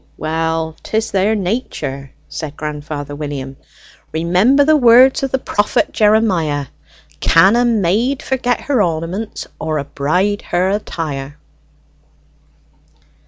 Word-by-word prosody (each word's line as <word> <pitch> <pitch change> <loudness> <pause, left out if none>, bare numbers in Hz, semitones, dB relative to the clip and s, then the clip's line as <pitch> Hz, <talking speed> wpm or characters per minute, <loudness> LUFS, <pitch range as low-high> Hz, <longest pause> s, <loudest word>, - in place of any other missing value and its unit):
"Well, 160 0 -2
'tis 220 0 -2
their 200 +3 +2
nature," 180 - -3 0.2
said 150 -2 -7
grandfather 150 -1 -5
William. 140 -2 -5 0.6
"Remember 185 - +3
the 310 +1 +5
words 255 +1 +6
of 270 - -1
the 265 - 0
prophet 205 -5 0
Jeremiah: 190 -10 +2 0.5
'Can 190 +6 +5
a 240 - +3
maid 230 +4 +1
forget 245 -2 -1
her 270 -6 +1
ornaments, 175 +5 -3
or 155 -1 -2
a 140 - -2
bride 180 +9 -1
her 180 +2 0
attire?'" 145 -8 -4
180 Hz, 115 wpm, -17 LUFS, 155-225 Hz, 0.6 s, words